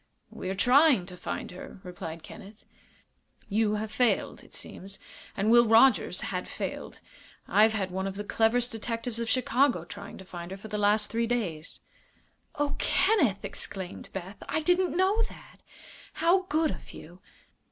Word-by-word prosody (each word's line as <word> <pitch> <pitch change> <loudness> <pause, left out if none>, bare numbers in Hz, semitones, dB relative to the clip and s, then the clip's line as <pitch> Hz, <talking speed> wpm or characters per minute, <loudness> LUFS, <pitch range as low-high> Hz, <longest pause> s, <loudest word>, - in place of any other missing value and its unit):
"We 185 - -6
are 190 - -2
trying 250 - +5
to 180 0 -9
find - - -5
her," 180 +1 -10
replied 170 -2 -7
Kenneth. 205 +3 -12 0.8
"You 210 0 +1
have 210 0 -3
failed, 240 +2 +1
it - - -14
seems, 195 +1 -7 0.4
and 210 +3 +2
Will 240 0 +7
Rogers 230 +3 +5
had - - -3
failed. - - -6 0.5
I've 215 +1 +5
had 195 -4 -2
one 190 +1 -2
of 195 - -5
the 205 - -4
cleverest 230 +3 +2
detectives 230 +1 -3
of 230 -1 -2
Chicago 255 - +2
trying 200 +3 -9
to 190 - -11
find 175 -1 -8
her 190 - -6
for 215 +3 -10
the 210 0 -2
last 210 +1 +2
three 230 0 0
days." 185 -10 -3 0.7
"Oh, 290 0 -1
Kenneth!" 365 - +2
exclaimed 190 -2 -7
Beth. 190 +1 -7
"I 315 - 0
didn't 355 +2 +2
know 390 +4 +3
that. - - -14 0.6
How 370 +3 +2
good 315 0 +2
of - - -9
you!" 175 +3 -12
220 Hz, 165 wpm, -28 LUFS, 190-250 Hz, 0.8 s, Will